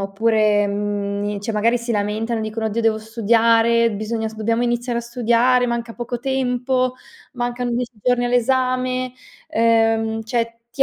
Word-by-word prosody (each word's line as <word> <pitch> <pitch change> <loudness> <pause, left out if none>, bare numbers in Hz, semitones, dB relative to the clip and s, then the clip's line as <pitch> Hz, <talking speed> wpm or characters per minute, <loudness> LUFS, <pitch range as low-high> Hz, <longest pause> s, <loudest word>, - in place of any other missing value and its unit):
oppure, 210 +1 +2
mhmm, 200 0 -2
ni 205 0 -3
cioè, 215 +3 -3
magari 230 +3 +2
si 235 0 -3
lamentano 215 +2 -1
e - - -3
dicono: 220 +1 -3
"Oddio, 220 +2 -1
devo 225 -1 +2
studiare!"; 230 +1 +3
"Bisogna 220 +2 -3
s 220 - -11
dobbiamo 230 +2 0
iniziare 240 0 -1
a - - -1
studiare, 240 +1 +2
manca 235 -1 -3
poco 240 0 -4
tempo, 255 -1 0 0.4
mancano 245 0 -2
10 240 +1 -2
giorni 245 -1 +2
all'esame." 255 +1 0 0.4
Uhm, 225 -1 +2
cioè, 230 0 -2
ti 270 - +2
230 Hz, 155 wpm, -20 LUFS, 220-245 Hz, 0.4 s, studiare